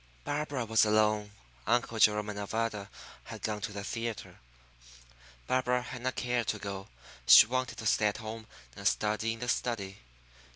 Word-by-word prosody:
Barbara 145 -4 -2
was 110 0 +4
alone. 105 -1 +2 0.4
Uncle 115 -1 +1
Jerome 105 -1 +4
and 105 - -6
Nevada 105 -1 -3 0.4
had - - -9
gone 105 -1 -2
to 105 - -4
the 100 0 -6
theatre. 115 +1 -5 1.1
Barbara 125 -1 +1
had 125 0 -8
not 130 +1 -2
cared 120 -2 -1
to 105 - 0
go. 100 -1 -6 0.4
She - - +10
wanted 130 +2 -2
to 110 - -7
stay 105 0 +3
at 105 - -2
home 110 0 -7 0.3
and - - -1
study 110 +1 0
in 115 - -10
the 120 - -3
study. 105 -5 -2
110 Hz, 165 wpm, -30 LUFS, 105-120 Hz, 1.1 s, She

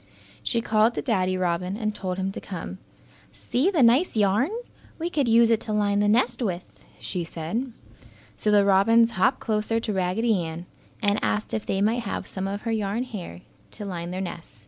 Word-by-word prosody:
She 235 - 0
called 220 +1 +3
to - - -2
Daddy 185 -7 +1
Robin 180 +2 -1
and 215 -2 -1
told 185 -3 -4
him 190 0 -1
to - - -7
come. 185 0 -7 0.5
"See 275 +10 0
the 330 -9 +3
nice 250 +9 +4
yarn! 210 - +3 0.5
We 340 +2 -3
could 285 -7 +1
use 230 0 +5
it 225 - +3
to 220 -1 -4
line 205 -1 +2
the 205 - +3
nest 240 +3 +2
with," 180 -6 -3 0.3
she 180 - -3
said. 170 +11 -4 0.6
So 215 - -1
the 205 -1 +5
robins 225 +4 +5
hopped 240 +7 +2
closer 220 0 0
to 220 -2 -2
Raggedy 190 +2 +1
Ann 165 +1 -6 0.4
and 205 0 +2
asked 210 0 -1
if 220 - -3
they 195 - 0
might 225 +4 +2
have 205 - -4
some 190 0 -4
of 200 +1 -4
her 230 - -2
yarn 215 +1 -1
hair 190 - -7 0.3
to 205 - -8
line 175 -3 -4
their 185 +1 -3
nest. 170 -7 -7
210 Hz, 195 wpm, -25 LUFS, 185-230 Hz, 0.6 s, use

